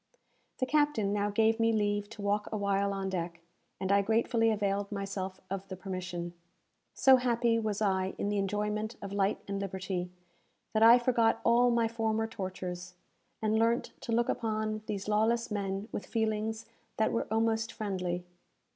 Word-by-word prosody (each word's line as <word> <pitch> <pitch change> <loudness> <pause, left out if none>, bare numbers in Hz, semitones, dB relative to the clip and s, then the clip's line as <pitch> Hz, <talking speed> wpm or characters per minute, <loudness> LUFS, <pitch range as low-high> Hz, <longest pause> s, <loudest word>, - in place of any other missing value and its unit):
The 255 - 0
captain 290 -8 +2
now 205 0 +1
gave 225 +2 +2
me 225 0 +4
leave 205 -1 0
to 220 -2 -9
walk 205 +1 0
awhile 200 -1 +1
on 195 -1 -2
deck, 170 -2 -3 0.4
and 190 0 -1
I 200 0 +5
gratefully 225 +2 +2
availed 200 -1 0
myself 195 -2 -4
of 195 0 -5
the 190 - -6
permission. 180 -2 -5 0.6
So 265 -1 +7
happy 235 -2 +2
was 215 -1 -1
I 190 -2 0
in 205 - -1
the 205 -1 0
enjoyment 210 +3 -1
of 200 0 -6
light 200 0 0
and 200 0 -2
liberty, 185 -2 -3 0.6
that 220 - +2
I 230 +2 +9
forgot 235 -2 +2
all 240 +1 +5
my 235 -1 +2
former 225 -1 0
tortures, 180 -4 -6 0.5
and 220 0 +2
learnt 230 +1 +1
to - - -5
look 235 +1 +2
upon 215 -1 -1
these 200 -1 -3
lawless 225 +2 +1
men 200 0 -2
with - - -5
feelings 220 0 -1 0.3
that 220 - +2
were 230 - -1
almost 225 0 +1
friendly. 185 -5 -3
210 Hz, 165 wpm, -31 LUFS, 195-225 Hz, 0.6 s, I